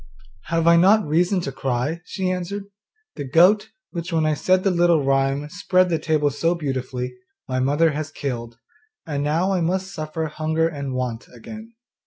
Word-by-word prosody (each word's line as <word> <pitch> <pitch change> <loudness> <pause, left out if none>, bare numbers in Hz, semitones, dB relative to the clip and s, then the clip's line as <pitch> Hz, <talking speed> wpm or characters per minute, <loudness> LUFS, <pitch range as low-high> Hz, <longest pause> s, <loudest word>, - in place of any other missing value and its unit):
'Have 165 -1 0
I 170 0 +6
not 200 +4 +5
reason 175 +5 +2
to 140 - -4
cry?' 135 +5 -2
she 185 -2 -2
answered, 185 +3 -3 0.5
'the 145 - -4
goat, 180 +10 +4 0.2
which 170 0 -5
when 160 -1 +1
I 155 - +2
said 185 +5 +2
the 195 - +2
little 170 -3 +3
rhyme, 135 +1 +1
spread 185 +1 +2
the 165 -2 0
table 150 -3 +1
so 165 +5 0
beautifully, 130 -4 -3 0.3
my 130 0 -1
mother 145 +5 +3
has 150 0 -4
killed, 120 -4 -5 0.5
and 145 -3 -2
now 165 +6 +1
I 185 - 0
must 190 +3 -1
suffer 155 0 -4
hunger 155 +1 0
and 140 -5 -5
want 125 -2 -3
again. 220 - -11
160 Hz, 175 wpm, -22 LUFS, 140-180 Hz, 0.5 s, I